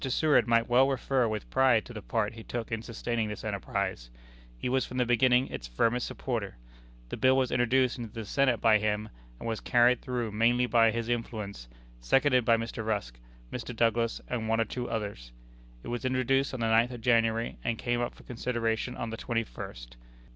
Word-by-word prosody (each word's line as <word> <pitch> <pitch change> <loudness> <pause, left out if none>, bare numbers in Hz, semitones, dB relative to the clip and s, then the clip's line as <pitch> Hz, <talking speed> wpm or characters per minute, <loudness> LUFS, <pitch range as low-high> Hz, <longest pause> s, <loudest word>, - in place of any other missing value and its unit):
Seward 150 -2 +3
might 115 0 +3
well 130 +3 +4
refer 130 -2 +1
with 110 -1 -4
pride 130 -4 +4
to 120 - -10
the 110 - -7
part 110 0 -1
he 115 - -10
took 120 +1 -5
in 115 -1 -2
sustaining 115 0 -3
this 105 - -6
enterprise. - - -3 0.5
He - - -3
was 130 0 +1
from 125 - -7
the 125 - +2
beginning 125 +2 +4
its - - -6
firmest 115 - 0
supporter. 115 -7 -4 0.5
The - - -5
bill 130 0 +4
was 130 -2 +1
introduced 125 +1 +2
into 115 -3 -6
the 115 -1 -6
Senate 130 +1 +2
by 110 -1 +5
him, 105 0 -1 0.3
and - - -7
was 115 -1 -2
carried 120 0 +3
through 120 -4 -3
mainly 120 +3 +3
by 115 -2 +4
his 115 0 -2
influence, 110 - -4 0.3
seconded 130 - +3
by 115 -1 +5
Mr. 115 0 -4
Rusk, 100 - -3 0.3
Mr. 125 0 -5
Douglas, 115 0 +1
and 115 -3 -3
one 115 0 +2
or 115 - +2
two 125 +1 -5
others. 100 - -4 0.5
It - - -7
was 120 +1 -3
introduced 130 +1 +1
on 125 - -5
the 115 - +1
ninth 115 +2 +4
of 120 -2 -8
January, 115 -1 +2
and 115 -1 -1
came 120 +1 -1
up 120 - -3
for - - -16
consideration 120 0 -2
on 115 - -4
the 115 - -5
twenty 115 -1 -1
first. - - -9
115 Hz, 200 wpm, -29 LUFS, 110-125 Hz, 0.5 s, by